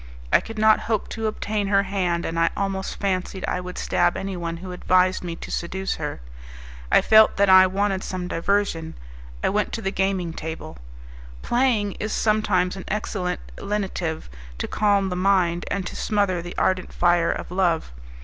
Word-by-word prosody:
I - - +7
could 225 0 -9
not 215 0 +5
hope 220 -3 0
to 225 -1 -3
obtain 215 -1 -2
her 200 0 +3
hand, 185 -3 -1
and 165 0 -2
I 165 - +4
almost 195 -1 -3
fancied 190 -1 -2
I 180 - -1
would 180 0 -8
stab 175 0 +1
anyone 175 -4 -4
who 185 +2 -8
advised 185 +1 +2
me 170 -1 -4
to - - -9
seduce 190 +3 -2
her. 150 - -5 0.7
I - - +6
felt 220 0 +6
that 200 -1 +4
I 185 0 +8
wanted 195 0 -1
some 180 -1 -4
diversion: 165 -2 -1 0.5
I - - +3
went 210 +1 0
to 225 - -3
the 195 - -1
gaming 190 -4 -1
table. 160 - -7 0.6
Playing 240 -5 +1
is 215 +1 -3
sometimes 205 -4 +1
an 190 - -8
excellent 190 -3 -2 0.2
lenitive 190 -5 -3 0.3
to - - -3
calm 200 -2 +2
the 180 - -3
mind, 180 -2 +2
and 195 -2 -2
to - - -6
smother 200 -5 0
the 175 +1 -8
ardent 185 -1 0
fire 175 -1 +2
of - - -5
love. 175 - +1
190 Hz, 175 wpm, -23 LUFS, 175-200 Hz, 0.7 s, I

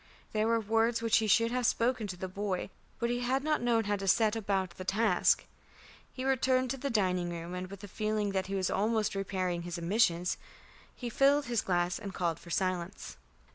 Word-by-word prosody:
There 215 0 +1
were 230 0 +3
words 225 +2 +1
which 225 -1 +4
he 220 - +1
should 230 +3 +4
have 250 -1 +1
spoken 235 -2 +1
to 180 -2 -6
the 185 - -4
boy, 195 0 -3 0.3
but 235 0 -1
he 245 - 0
had 260 +3 0
not 305 0 +1
known 235 -2 +2
how 205 0 0
to 195 0 -5
set 215 +3 +4
about 195 -4 -1
the 185 - -8
task. 195 0 +2 0.7
He 255 - -5
returned 260 -1 +2
to 270 - -3
the 280 +2 -3
dining 185 -6 +1
room, 170 +1 -6
and 180 0 -5
with 200 +1 -10
a - - -6
feeling 215 0 -1
that 190 -1 -1
he 195 - -3
was 190 -2 0
almost 215 0 +1
repairing 185 -3 -2
his 175 +1 -5
omissions, 175 -1 +1 0.6
he 245 - -6
filled 280 +4 +4
his 235 -2 0
glass 175 -1 0
and 200 -3 -7
called 170 -3 -1
for 170 - -13
silence. 185 +1 -2
205 Hz, 210 wpm, -31 LUFS, 185-230 Hz, 0.7 s, which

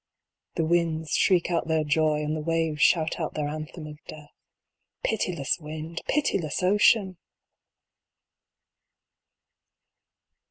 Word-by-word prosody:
The 165 - 0
winds 160 -2 0
shriek 180 -2 +2
out 170 -1 0
their 160 -1 +1
joy, 150 0 +1
and 150 +1 -2
the 155 - -3
waves 165 -2 -1
shout 160 +3 +3
out 160 - -3
their 150 -1 -1
anthem 155 +2 -6
of 150 0 -11
Death. 150 -1 -11 0.7
Pitiless 180 -9 -1
wind! 155 +1 -6
Pitiless 190 - 0
ocean 195 0 +3
160 Hz, 110 wpm, -26 LUFS, 155-170 Hz, 0.7 s, shout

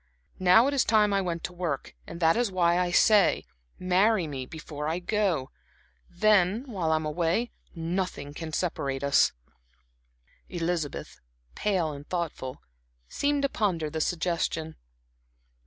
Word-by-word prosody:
Now 185 +6 +6
it 280 - 0
is 275 - +3
time 210 -2 +3
I 195 - +2
went 170 -3 -3
to 180 - -5
work. 170 -6 -3
And 170 - -8
that 165 -1 +4
is 235 -3 +1
why 175 -1 +2
I 180 -1 +1
say 205 +2 +4 0.3
marry 185 +2 +2
me 135 -4 -5
before 150 -1 -6
I 160 +2 0
go. 180 -7 -1 0.6
Then, 205 +3 +3
while 185 - -2
I - - +4
am 155 0 -1
away, 170 +9 0 0.2
nothing 165 -3 -3
can 160 +1 -6
separate 140 -5 -2
us." 140 0 +4 1.2
Elizabeth, 170 -3 -3 0.3
pale 180 - 0
and 145 0 -10
thoughtful, 160 -7 -4 0.5
seemed 285 0 0
to 275 - +2
ponder 175 - -1
the 160 0 -2
suggestion. 165 -2 -1
175 Hz, 140 wpm, -27 LUFS, 160-195 Hz, 1.2 s, Now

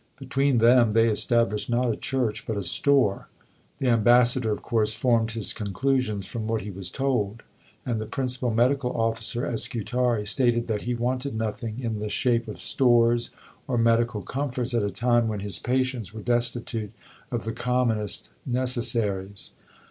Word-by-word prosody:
Between 135 0 +1
them, 115 -1 +5
they 115 +1 +4
established 110 0 +1
not 120 0 +1
a - - -2
church, 115 -5 -2
but 110 - -2
a 100 - -2
store. 125 +3 +2 0.5
The 130 - 0
Ambassador 120 +1 +4
of 105 - -3
course 110 -2 0
formed 115 -3 +1
his 115 -3 -1
conclusions 105 0 -1
from 110 +2 -5
what 110 -2 -1
he 105 - -6
was 95 -1 -4
told; 115 -4 -1 0.4
and 120 -3 -1
the 110 - -5
Principal 125 -1 -1
Medical 125 +2 +1
Officer 115 +1 -1
at 115 - -2
Scutari 120 -1 -1
"stated 120 +1 +2
that 110 -3 -2
he 125 +1 -2
wanted 125 +2 -2
nothing 110 +1 -3
in 115 -4 -3
the 105 0 -3
shape 120 0 +1
of 105 - -7
stores 120 -2 +3 0.4
or 125 - 0
medical 115 -2 +2
comforts 125 +1 -3
at 115 - +2
a 100 - 0
time 120 +1 +1
when 105 -2 -3
his 100 -1 -3
patients 125 -5 -1
were 110 - -6
destitute 120 -3 -1 0.4
of 120 -4 -3
the 115 - -3
commonest 120 -5 0
necessaries. 115 -6 0
115 Hz, 165 wpm, -25 LUFS, 110-125 Hz, 0.5 s, them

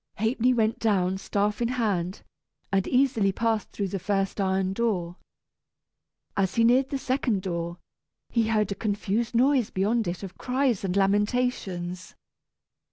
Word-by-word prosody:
Ha'penny 230 +3 +2
went 225 -2 +1
down, 190 -4 +1
staff 205 +2 -1
in 235 - +2
hand, 205 -7 -1 0.5
and 195 -1 +1
easily 250 -6 +3
passed 225 +1 -1
through 200 -2 -3
the 195 - -3
first 195 +2 -1
iron 190 0 +1
door. 195 -6 -1 1.2
As 190 -2 0
he 230 - +4
neared 255 +3 +4
the 275 - -1
second 255 -7 -1
door, 170 -2 -3 0.5
he 230 -2 +1
heard 215 -2 +1
a - - +2
confused 215 +3 -2
noise 255 -1 +3
beyond 215 +4 0
it 175 +3 -4
of 190 - -9
cries 255 -4 0
and 185 -1 -1
lamentations. 195 -3 0
205 Hz, 145 wpm, -26 LUFS, 190-235 Hz, 1.2 s, he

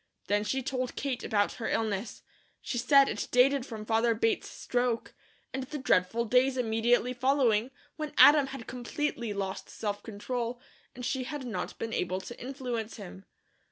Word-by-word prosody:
Then 205 +1 +1
she 265 +5 -1
told 255 -1 -2
Kate 270 -3 -3
about 205 -3 +1
her - - -1
illness. 215 -1 -2 0.4
She 245 - -3
said 275 +3 +6
it - - -3
dated 260 +1 +4
from 215 -2 -7
father 225 +1 +2
Bates 225 +1 0
stroke, 245 -2 -1 0.4
and 265 - -2
the 295 - -5
dreadful 230 -2 +2
days 255 +3 +3
immediately 240 +1 +2
following, 250 -3 +2 0.3
when 305 -2 -5
Adam 290 -2 +8
had 270 -4 -7
completely 245 -1 -3
lost 195 -1 -4
self 205 -2 -4
control, 235 +3 -4 0.4
and 250 0 -6
she 260 -1 -1
had 290 -1 -5
not 235 - -4
been 225 0 -4
able 185 +1 -1
to 240 +5 -9
influence 245 -4 -4
him. 190 -2 -10
240 Hz, 160 wpm, -30 LUFS, 220-260 Hz, 0.4 s, Adam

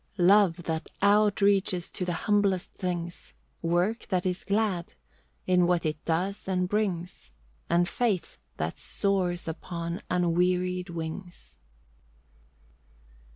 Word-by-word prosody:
Love, 185 -2 +5
that 160 -1 -3
outreaches 200 -3 +3
to - - -3
the 180 -1 -1
humblest 200 -3 +2
things; 175 -2 -5 0.3
Work 175 +7 0
that 185 -2 0
is 180 0 -1
glad, 200 - -1 0.5
in 180 -1 +4
what 175 -2 +1
it 155 -1 -2
does 185 +5 -1
and 180 -1 +1
brings; 180 - -2 0.4
And 175 +1 +3
faith 200 - -1 0.2
that 80 +2 -3
soars 185 -4 0
upon 170 +2 -4
unwearied 180 +1 +1
wings. 165 - -7
180 Hz, 110 wpm, -28 LUFS, 170-195 Hz, 0.5 s, Love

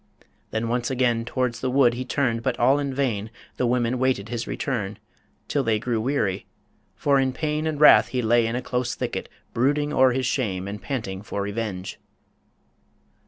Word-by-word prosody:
Then 110 +1 -2
once 120 0 -1
again 120 -3 +1
Towards 125 -1 -1
the 130 - -1
wood 125 -2 +4
he 125 +2 -3
turned, 125 -3 0
but 130 -1 -1
all 135 +4 +4
in 140 -1 -2
vain 120 -6 -1 0.3
The 125 - +1
women 120 0 +1
waited 125 -5 0
his 120 -1 -3
return, 110 -7 -3 0.5
till 140 - 0
they 110 -3 +2
Grey 120 +1 -1
weary.. 110 -5 -1 0.5
for 140 -1 +2
in 130 -1 +1
pain 155 +2 -1
and 155 -2 -2
wrath 150 - +8
he 125 -2 -2
lay 115 +1 +3
In 115 - -2
a 125 - -3
close 125 -1 -2
thicket, - - -4 0.2
brooding 145 +4 +1
o'er 130 -2 +5
his 130 0 -1
shame, 100 -7 -1
And 100 0 -6
panting 95 -5 -4
for 100 -1 -4
revenge. 100 -3 -4
120 Hz, 180 wpm, -24 LUFS, 110-130 Hz, 0.5 s, wrath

